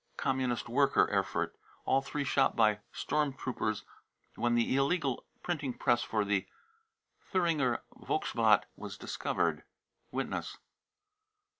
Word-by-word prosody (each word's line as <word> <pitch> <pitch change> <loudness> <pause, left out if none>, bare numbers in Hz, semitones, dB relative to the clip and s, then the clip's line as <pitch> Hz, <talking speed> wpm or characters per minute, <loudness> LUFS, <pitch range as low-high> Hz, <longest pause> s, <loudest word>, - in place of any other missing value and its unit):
communist 130 -3 0
worker, 135 +4 +4
Erfurt. - - 0 0.3
All 135 - +3
three 145 +1 -3
shot 135 0 +2
by 105 -2 +4
storm 150 -2 0
trooped 110 -6 -2 0.5
when 120 0 +1
the 120 +2 +2
illegal 140 -1 +1 0.2
printing 150 -7 -2
press 120 - +3
used - - -6
for 105 -2 +1
the 100 -1 0 0.8
Thuringer 160 - +2
Volksbktl 390 +9 +2
was - - -7
discovered. - - -1 0.5
(Witness?) - - -3
130 Hz, 115 wpm, -32 LUFS, 120-145 Hz, 0.8 s, worker